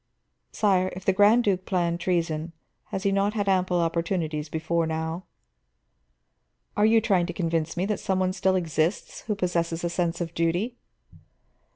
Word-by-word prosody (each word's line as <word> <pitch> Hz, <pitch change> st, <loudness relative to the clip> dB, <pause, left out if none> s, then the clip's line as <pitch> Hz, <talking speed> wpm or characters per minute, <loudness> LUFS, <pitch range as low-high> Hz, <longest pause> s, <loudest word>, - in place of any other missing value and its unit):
Sire, 185 Hz, -3 st, +2 dB
if 185 Hz, -, -9 dB
the 190 Hz, -, +3 dB
Grand 210 Hz, +5 st, +5 dB
Duke 190 Hz, -3 st, +1 dB
planned 175 Hz, -2 st, 0 dB
treason, 165 Hz, -2 st, -1 dB, 0.3 s
has 190 Hz, -, -5 dB
he 200 Hz, -, +2 dB
not 200 Hz, +2 st, +1 dB
had 205 Hz, -2 st, -1 dB
ample 185 Hz, -2 st, +2 dB
opportunities 165 Hz, -2 st, -1 dB
before 160 Hz, +1 st, -1 dB
now?" 160 Hz, +2 st, -3 dB, 1.5 s
"Are 210 Hz, +1 st, +4 dB
you 225 Hz, +1 st, +5 dB
trying 190 Hz, -6 st, +2 dB
to 175 Hz, -, -4 dB
convince 165 Hz, -2 st, -1 dB
me 180 Hz, -, +1 dB
that 210 Hz, 0 st, -1 dB
some 190 Hz, -1 st, -1 dB
one 185 Hz, 0 st, +1 dB
still 190 Hz, 0 st, +1 dB
exists 165 Hz, 0 st, -1 dB
who 210 Hz, -, 0 dB
possesses 170 Hz, -3 st, -1 dB
a 170 Hz, -, -1 dB
sense 170 Hz, -1 st, -1 dB
of 170 Hz, -1 st, -4 dB
duty?" 175 Hz, +9 st, 0 dB
180 Hz, 165 wpm, -26 LUFS, 165-195 Hz, 1.5 s, Grand